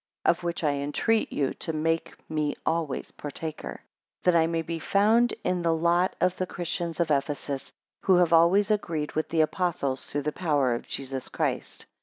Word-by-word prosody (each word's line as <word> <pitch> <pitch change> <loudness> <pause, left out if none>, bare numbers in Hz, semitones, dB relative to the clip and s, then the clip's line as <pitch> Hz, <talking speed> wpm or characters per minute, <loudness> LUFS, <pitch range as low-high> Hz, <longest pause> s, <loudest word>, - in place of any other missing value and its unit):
8 - - +5
Of - - -6
which 170 0 -2
I 150 - +3
entreat 145 +11 0
you 140 -2 0
to 165 - -2
make 165 +1 -1
me 150 -2 -1
always 160 -4 -1
partaker, 155 +2 -6 0.4
that 180 -1 +4
I 165 -1 +5
may 165 0 -1
be 165 +1 -4
found 220 +7 +3
in 180 -1 0
the 165 -1 +2
lot 170 +3 +2
of 180 - +2
the 185 - -1
Christians 175 -1 -3
of 165 -2 +1
Ephesus, 140 -1 -1 0.3
who 190 - +6
have 175 -2 +4
always 185 +6 +5
agreed 165 -8 -1
with 155 - -2
the 160 -1 +3
Apostles, 155 -5 0
through 145 0 -3
the 150 - 0
power 145 -7 +1
of 120 - -5
Jesus 135 -1 -4
Christ. - - -2
165 Hz, 185 wpm, -27 LUFS, 150-175 Hz, 0.4 s, who